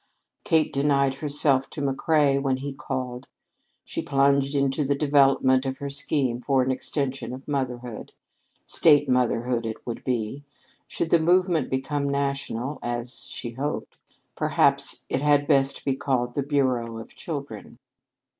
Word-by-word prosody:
Kate 160 -1 +2
denied 140 -1 +2
herself 140 -1 +1
to - - -8
McCrea 140 0 +2
when 135 -2 0
he 140 +1 -5
called. 130 -2 -5 0.6
She - - -4
plunged 140 0 +2
into 140 +1 +1
the 140 +1 +1
development 135 -2 +3
of 135 -1 -3
her 140 0 -5
scheme 140 -3 -1
for 135 -1 +2
an 130 - 0
extension 135 0 -2
of 130 - -13
motherhood. 125 -5 -4 0.5
State 145 -3 +4
motherhood 125 -1 +1
it 110 -1 -6
would 120 - -5
be. 125 +2 -2 0.4
Should 165 - -3
the 170 - +6
movement 175 -2 +2
become 140 +2 -1
national, 140 -1 -2
as 120 +1 -4
she 120 - -6
hoped, 140 +5 -4 0.4
perhaps - - +1
it 135 - -1
had 145 -1 +3
best 140 -2 +1
be 135 - +1
called 125 -3 -1
the 140 - -1
Bureau 130 -5 0
of 115 - -10
Children. 140 -9 -7
135 Hz, 145 wpm, -25 LUFS, 125-145 Hz, 0.6 s, the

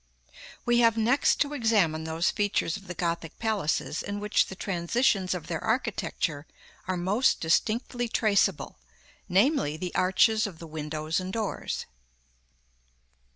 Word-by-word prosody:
We 240 0 +3
have 230 -1 +4
next 240 +6 +3
to 290 0 +1
examine 205 - +1
those 160 +1 0
features 205 -6 0
of 195 -1 -10
the 180 - -6
Gothic 170 -2 -3
palaces 200 -8 -1
in 205 0 -4
which 210 +1 +2
the 190 - -8
transitions 190 +1 0
of 170 -3 -6
their 165 -2 -4
architecture 205 - -2 0.4
are 185 -1 -1
most 200 +9 +2
distinctly 230 +8 0
traceable; 200 -6 +1 0.5
namely, 195 - +2
the 180 +2 -5
arches 215 +4 +3
of 180 -5 -10
the 165 - -9
windows 155 +1 -3
and 185 0 -5
doors. 220 -1 -3
195 Hz, 135 wpm, -27 LUFS, 165-225 Hz, 0.5 s, have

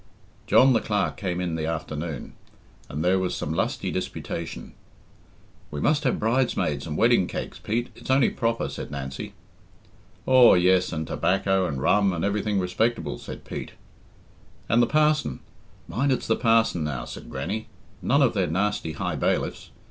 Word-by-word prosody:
John 130 0 +6
the - - +3
Clerk 105 -1 0
came 90 -3 -3
in 90 -2 -2
the 80 -1 -2
afternoon, 80 -2 -4 0.6
and 75 +4 -3
there 95 +1 +3
was 95 -1 -1
some 75 - -3
lusty - - -1
disputation. - - -5 1.0
"We 75 - -5
must 150 - +1
have 125 - +2
bridesmaids 110 - 0
and 75 -1 -3
wedding 115 -6 +4
cakes, - - -5
Pete 120 +3 -2
it's - - -12
only 130 -1 +4
proper," 115 0 -1
said - - -6
Nancy. 70 -1 -6 0.9
"Aw, 130 -4 +7
yes, 90 0 +3
and 80 -1 -3
tobacco 95 +2 +1
and 70 -4 -3
rum, 100 +8 +3
and 85 +1 -1
everything 105 0 0
respectable," 90 - -1
said - - -9
Pete. - - -6 0.9
"And 115 +2 +4
the 120 - +3
parson 155 0 +1 0.5
mind 125 +11 0
it's 130 - 0
the 110 - +2
parson 115 -7 +2
now," 70 -5 -3
said - - -9
Grannie; 110 +2 -4 0.3
"none - - +3
of - - +3
their - - +1
nasty 90 -1 -1
high 70 - -3
bailiffs. - - -1
95 Hz, 160 wpm, -25 LUFS, 80-115 Hz, 1.0 s, Aw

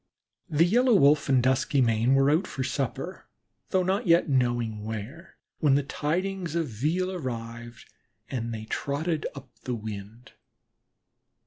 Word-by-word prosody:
The 155 +2 +4
Yellow 240 +5 +4
Wolf 145 -4 +4
and 130 -2 +4
Duskymane 130 -2 +2
were 135 +1 +4
out 165 +6 +2
for 130 - -4
supper, 135 +7 -3 0.4
though 185 -1 +2
not 190 +2 0
yet 170 +1 +5
knowing 120 -5 0
where, 110 - -7 0.2
when 145 -3 +4
the 145 - +2
tidings 170 +4 -2
of 165 -2 0
veal 160 - -1
arrived, 120 -7 -6 0.4
and 115 -3 -3
they 110 -1 -5
trotted 150 +7 -2
up 135 -2 -11
the 125 - -3
wind. 110 +1 -8
135 Hz, 135 wpm, -27 LUFS, 120-170 Hz, 0.4 s, yet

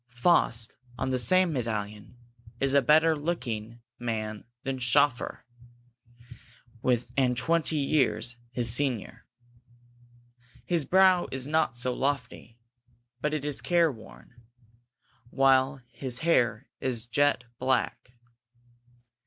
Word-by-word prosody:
Faust, 120 -5 +2 0.2
on 130 0 -2
the 130 - 0
same 180 +8 +4
medallion, 110 -2 -4 0.4
is 135 0 +2
a 140 - +5
better 155 +4 +4
looking 120 -8 -4 0.2
man 110 -3 -4 0.2
than 135 -1 -3
Schoeffer, 130 +1 +1 1.7
and 125 -3 +1
twenty 160 +4 +1
years 135 -5 +1
his 120 -2 +1
senior. 120 -4 -1 1.4
His 170 -5 0
brow 185 0 +4
is 130 0 -4
not 155 -5 0
so 125 +1 -1
lofty, 125 -4 -3 0.6
but 150 - 0
it 145 -2 -4
is 145 -2 -1
care 170 -3 +2
worn, 120 +1 -15 0.9
while 135 0 +2
his 130 -1 -4
hair 130 -7 +1
is 125 -3 -2
jet 145 +2 +1 0.2
black. 130 -1 -1
130 Hz, 105 wpm, -27 LUFS, 120-145 Hz, 1.7 s, a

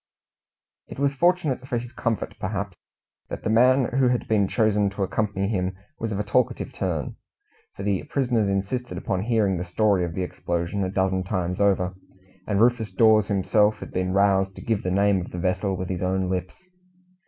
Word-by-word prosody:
It - - -10
was 140 0 +1
fortunate 155 -4 +1
for 125 - -1
his 120 +1 -6
comfort, 115 -3 -2
perhaps, 100 -1 -3 0.5
that - - -6
the 110 - 0
man 130 +3 +5
who 130 - +4
had 125 -1 0
been 105 -3 +2
chosen 105 -2 +2
to 100 0 -3
accompany 100 0 -1
him 95 -3 -2 0.2
was 115 -1 -3
of 100 - -2
a - - 0
talkative 120 +4 0
turn, 85 -7 -3 0.6
for 100 - -6
the 100 -2 0
prisoners 120 -7 0
insisted 100 +1 -2
upon 95 0 -2
hearing 105 -4 +1
the 85 - -3
story 95 +1 +1
of 85 -2 -4
the 95 - -1
explosion 85 +2 -2
a 95 - -1
dozen 95 -1 0
times 90 0 -2
over, 95 -2 +2 0.5
and 100 -2 +1
Rufus 120 -1 +2
Dawes 110 -3 +4
himself 105 +2 +2
had - - -9
been 90 0 -1
roused 95 -1 +2
to - - -9
give 110 -3 0
the 90 - -2
name 100 0 +2
of 90 - -7
the - - -7
vessel 95 +2 -1
with 90 0 -4
his 90 -2 -3
own 95 0 0
lips. 90 - -4
100 Hz, 190 wpm, -24 LUFS, 95-115 Hz, 0.6 s, man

